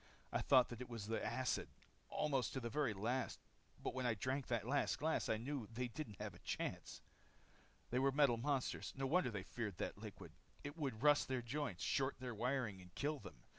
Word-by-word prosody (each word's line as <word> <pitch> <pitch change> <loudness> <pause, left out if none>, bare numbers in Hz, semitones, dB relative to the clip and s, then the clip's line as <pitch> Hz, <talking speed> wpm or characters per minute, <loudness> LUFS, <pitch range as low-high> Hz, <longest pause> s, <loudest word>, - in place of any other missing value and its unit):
"I - - +1
thought 130 -3 +6
that 120 0 -6
it 125 - -5
was 115 -4 -4
the 110 +1 -1
acid, 120 +4 0 0.4
almost 135 -4 +1
to 130 - -1
the 120 -2 -3
very 145 -2 +2
last. 120 +7 0 0.4
But - - -2
when 130 -1 0
I 115 - +2
drank 130 +6 -1
that 115 -4 0
last 140 +3 +2
glass, 160 +2 +1
I 110 - +3
knew 125 0 -3
they 125 +2 -2
didn't 115 -6 -6
have 105 -2 -3
a 90 - -13
chance. - - -3 0.9
"They 125 - +3
were 135 +1 +4
metal 135 -4 +5
monsters. 135 +2 0
No 135 - 0
wonder 160 +1 +3
they 100 -4 -3
feared 105 -4 -4
that - - -3
liquid. - - -8 0.3
It 145 +1 -5
would 135 -7 -2
rust 145 -1 +6
their 130 -2 0
joints, 125 -6 -2
short 135 0 +1
their 125 -1 -3
wiring, 120 -4 0
and 90 0 -15
kill 150 +1 0
them. 70 - -11
125 Hz, 210 wpm, -41 LUFS, 115-140 Hz, 0.9 s, thought